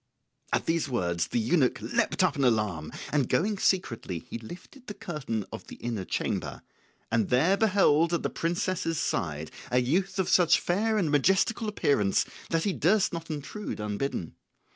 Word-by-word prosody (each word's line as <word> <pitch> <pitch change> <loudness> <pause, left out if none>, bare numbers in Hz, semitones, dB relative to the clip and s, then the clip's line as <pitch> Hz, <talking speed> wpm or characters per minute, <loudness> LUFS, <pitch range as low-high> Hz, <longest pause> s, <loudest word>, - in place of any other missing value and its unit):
At - - +1
these 165 -3 0
words 85 -8 0
the - - -2
eunuch 125 +4 +2
leapt - - 0
up - - +2
in 140 - 0
alarm, 105 -10 +1 0.2
and 140 -5 +2
going 205 +2 +1
secretly 115 - 0
he 115 - -7
lifted 180 - -12
the 210 - -6
curtain 135 - -4
of - - -8
the - - -9
inner 115 -6 -4
chamber, - - -3 0.5
and 115 -2 +1
there 150 +10 +4
beheld 185 -6 +3
at 170 - 0
the - - 0
princess's 170 -1 -1
side - - -2 0.2
a 125 - +1
youth 170 +12 +1
of 190 -2 +1
such 175 -3 +5
fair 215 +5 +1
and 170 -8 +1
majestical 190 - +2
appearance 105 - +2 0.2
that 165 -1 +1
he 200 - 0
durst 195 +3 +2
not 165 -1 -5
intrude 155 - -5
unbidden. 105 - -3
160 Hz, 165 wpm, -28 LUFS, 115-190 Hz, 0.5 s, such